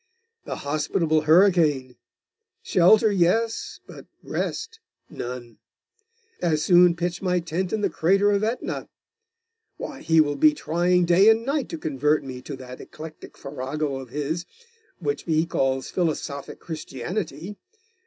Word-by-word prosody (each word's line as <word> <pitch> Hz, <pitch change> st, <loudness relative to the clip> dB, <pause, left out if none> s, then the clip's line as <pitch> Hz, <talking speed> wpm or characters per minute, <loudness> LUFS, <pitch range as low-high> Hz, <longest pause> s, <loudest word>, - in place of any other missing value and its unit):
'The -, -, -4 dB
hospitable 155 Hz, +2 st, 0 dB
hurricane! 160 Hz, -8 st, +4 dB, 0.7 s
Shelter, 210 Hz, +4 st, +5 dB
yes; 205 Hz, +5 st, 0 dB
but -, -, -12 dB, 0.2 s
rest, 450 Hz, 0 st, -4 dB, 0.3 s
none. 120 Hz, -2 st, -7 dB, 0.8 s
As 155 Hz, -3 st, +1 dB
soon 175 Hz, -1 st, +6 dB
pitch 175 Hz, +1 st, -3 dB
my 180 Hz, -2 st, +1 dB
tent 175 Hz, +2 st, -3 dB
in 220 Hz, -, -1 dB
the -, -, +1 dB
crater 195 Hz, +5 st, +3 dB
of 200 Hz, 0 st, +1 dB
Aetna. 230 Hz, +3 st, -3 dB, 0.9 s
Why, 275 Hz, -, -7 dB
he 160 Hz, 0 st, +3 dB
will 145 Hz, -2 st, +2 dB
be 305 Hz, -1 st, +5 dB
trying 175 Hz, -, +1 dB
day 180 Hz, +5 st, +6 dB
and 225 Hz, +1 st, +3 dB
night 280 Hz, 0 st, -1 dB
to -, -, -5 dB
convert 150 Hz, 0 st, 0 dB
me 130 Hz, -2 st, -7 dB
to 140 Hz, +2 st, -7 dB
that 130 Hz, -1 st, -10 dB
eclectic 155 Hz, 0 st, -11 dB
farrago 140 Hz, +1 st, -4 dB
of 130 Hz, -2 st, -9 dB
his, 150 Hz, +6 st, -3 dB, 0.5 s
which 430 Hz, -, -2 dB
he 160 Hz, -1 st, +2 dB
calls 135 Hz, -4 st, -1 dB
philosophic 155 Hz, -5 st, -3 dB
Christianity. 165 Hz, -, -5 dB
165 Hz, 135 wpm, -24 LUFS, 145-190 Hz, 0.9 s, soon